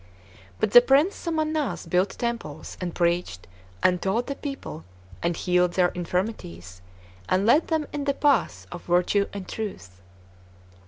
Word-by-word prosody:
But 210 - +1
the 245 - +10
Prince 280 +10 +3
Somannass 310 - -2
built 180 +4 +1
temples, 230 -11 -4
and 175 -2 -4
preached, 170 - 0 0.4
and 180 -1 +3
taught 220 +6 0
the 280 - -3
people, 275 - -7 0.4
and 170 -1 -1
healed 180 -1 +2
their 180 -1 +3
infirmities, 165 - -4 0.5
and 190 +2 +2
led 285 +9 +4
them 320 -2 0
in 290 -1 -3
the 280 -1 +1
paths 225 - +1
of - - -7
virtue 180 +3 +2
and 200 -2 -7
truth. 95 - -7
190 Hz, 145 wpm, -25 LUFS, 175-275 Hz, 0.5 s, the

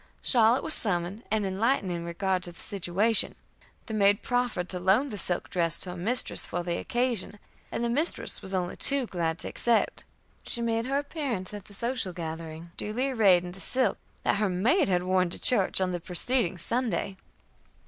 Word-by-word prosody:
Charlotte 235 0 +4
was 315 - +2
summoned, 185 +1 0
and 215 -1 0
enlightened 195 +1 0
in 170 -1 -3
regard 185 +2 -1
to 175 - -7
the 170 - -15
situation; 200 +3 +1 0.5
the 220 - -6
maid 205 -1 +3
proffered 245 -7 -1
to 180 - -3
loan 195 +10 +3
the 215 - -6
silk 175 -1 -1
dress 170 -2 +3
to 180 - -3
her - - -7
mistress 220 +8 +1
for 175 +1 -3
the 170 -1 -2
occasion, 240 -4 -2 0.3
and - - -2
the - - +1
mistress 290 +9 +1
was 190 0 -3
only 180 -1 -2
too 280 -2 +3
glad 170 -6 -2
to - - -5
accept. 235 -1 0 0.4
She - - -4
made 230 0 -1
her 275 +1 0
appearance 280 - -4
at 205 -2 -8
the 200 - -12
social 235 -4 -2
gathering, 165 0 -7
duly 250 +6 -1
arrayed 195 -8 +4
in 175 - -6
the 190 +2 -13
silk 255 +5 0 0.2
that - - +2
her 210 -1 +1
maid 225 - +2
had 180 -1 +1
worn 185 -1 +2
to - - -8
church 200 -7 +4
on 185 -1 0
the 175 - -3
preceding 180 +4 +3
Sunday." 230 0 -2
200 Hz, 190 wpm, -27 LUFS, 180-235 Hz, 0.5 s, Charlotte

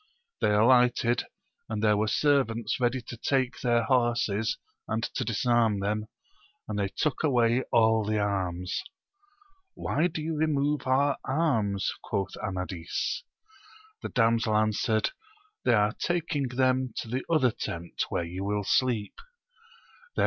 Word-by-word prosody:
They - - +2
alighted, 120 +1 +4 0.4
and 110 -1 -3
there 105 -1 +4
were 105 +1 +1
servants 120 -4 +1
ready 125 0 0
to 120 - -8
take 130 +1 0
their 120 -2 +2
horses^ 115 -3 +1 0.3
and - - -1
to - - -2
disarm 120 -5 +2
them, 105 +2 -2 0.6
and 105 -1 -3
they 100 - +1
took 150 +9 -2
away 120 -4 +3
all 110 -1 +4
the 110 +1 0
arms. 95 -3 -1 0.9
Why 155 +5 0
do 160 -3 -5
you 160 0 -2
remove 150 -2 0
our 140 +2 +3
arms 115 - 0
1 - - -15
quoth 100 -2 -2
Amadis. 90 - -3 0.8
The - - -4
damsel 115 -3 +2
answered, 110 0 +1 0.5
They 120 - +5
are 105 +1 +2
taking 170 -5 -1
them 130 0 +1
to - - -3
the 125 +3 -2
other 150 -7 +3
teni 85 -7 -6 0.2
where - - -1
yon 90 +3 -5
will 105 0 0
sleep* 115 -1 +1 1.0
Then. - - -3
115 Hz, 140 wpm, -28 LUFS, 105-130 Hz, 1.0 s, They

